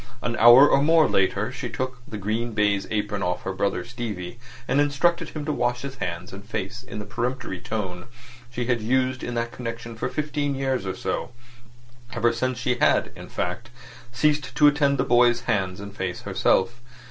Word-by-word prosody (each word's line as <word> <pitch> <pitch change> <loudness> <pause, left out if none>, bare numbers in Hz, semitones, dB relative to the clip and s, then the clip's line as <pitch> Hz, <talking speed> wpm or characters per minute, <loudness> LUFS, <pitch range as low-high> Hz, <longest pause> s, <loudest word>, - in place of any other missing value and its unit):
An 120 - -1
hour 120 +5 +9
or 140 - +4
more 160 +1 +5
later 100 +4 +1
she 130 -1 -5
took 130 +2 -4
the 110 - -6
green 110 +4 -2
baize 105 -2 +1
apron 105 -1 -2
off 90 -1 -1
her 95 - -3
brother 100 +1 -1
Stevie, 115 -4 -6 0.3
and 140 - +3
instructed 145 +4 +1
him 150 -2 -6
to 155 - 0
wash 120 -1 -1
his 135 -1 -6
hands 85 -1 -5
and 100 +1 -9
face 105 +2 -4
in 125 -3 -9
the 105 - -5
peremptory 120 -5 -3
tone 90 -5 -4 0.4
she 120 0 -3
had 120 -2 0
used 130 +3 +1
in 120 - -4
that 115 0 -1
connection 115 -1 -6
for 110 - -3
fifteen 145 -2 -2
years 130 -6 -1
or 95 - -2
so—ever 120 0 -4
since 130 +1 -1
she 125 +1 -1
had, - - +3
in - - -10
fact, 100 +7 -3 0.4
ceased 145 0 0
to 150 - +5
attend 145 -1 +4
to 125 - +2
the - - -7
boy's 120 -1 +4
hands 95 -6 -1
and 100 0 -9
face 95 -3 -3
herself. 120 +6 +1
120 Hz, 190 wpm, -24 LUFS, 105-130 Hz, 0.4 s, hour